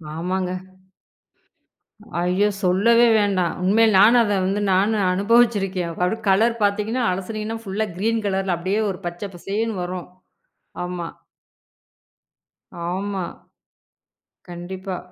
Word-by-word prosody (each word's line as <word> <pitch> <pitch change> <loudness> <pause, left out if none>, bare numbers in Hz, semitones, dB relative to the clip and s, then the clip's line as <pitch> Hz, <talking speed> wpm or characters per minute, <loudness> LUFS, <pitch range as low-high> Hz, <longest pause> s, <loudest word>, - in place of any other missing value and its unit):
ஆமாங்க. 180 +2 -2 1.7
ஐயோ! 185 +4 +2
சொல்லவே 230 +6 +4
வேண்டாம். 195 -4 +1
உண்மையிலே 215 +3 +4
நானும் 235 +4 +7
அத 205 -2 0
வந்து 200 +2 0
நானு 205 +4 +2 0.2
அனுபவிச்சிருக்கேன். 200 -4 +2
அது 220 - -1
கலர் 225 +5 +3
பார்த்தீங்கன்னா 210 +5 0
அலசினீங்கன்னா 215 +4 -4
ஃபுள்ளா 205 +2 -2
கிறீன் 225 +3 0
கலர்ல 190 -2 0
அப்படியே 190 +5 -1
ஒரு 185 - -5
பச்சை 175 +4 -5
பசேல்னு 205 +3 -3
வரும். 180 0 -5 0.8
ஆமா, 175 -2 -4 1.8
ஆமா, 195 0 -3 1.3
கண்டிப்பா. 185 +2 -6
195 Hz, 100 wpm, -22 LUFS, 185-220 Hz, 1.8 s, நானும்